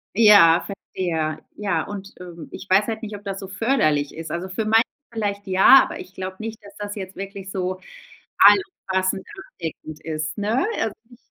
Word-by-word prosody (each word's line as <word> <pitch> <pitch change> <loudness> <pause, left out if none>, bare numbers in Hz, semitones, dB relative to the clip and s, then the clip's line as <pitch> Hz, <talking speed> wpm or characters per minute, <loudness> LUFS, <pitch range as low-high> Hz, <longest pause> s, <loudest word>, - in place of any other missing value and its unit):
Ja, 200 -7 +7
verstehe. 165 -5 -3 0.2
Ja, 200 -6 -1
und, 200 -1 -8
ähm, 170 -3 -10
ich 195 - -9
weiß 195 +3 +4
halt 220 0 -3
nicht, 210 -1 -5
ob 205 - -11
das 195 -1 -4
so 195 - -7
förderlich 190 - +1
ist. 160 -1 -7
Also 180 +2 -4
für 200 +4 -3
manche 225 +1 +5 0.3
vielleicht 205 -3 -3
ja, 190 +8 +7
aber - - -6
ich 185 - -11
glaube 185 0 -6
nicht, 225 0 -5
dass 200 0 -14
das 205 0 -5
jetzt 190 -1 -7
wirklich 195 0 -7
so 185 0 -3 0.6
allumfassend 190 - +3 0.3
abdeckend 155 -2 -7
ist, 155 +1 -4
ne? 215 +5 +1
Also, 220 - -1 0.2
ich 240 - -16
195 Hz, 180 wpm, -22 LUFS, 180-210 Hz, 0.6 s, Ja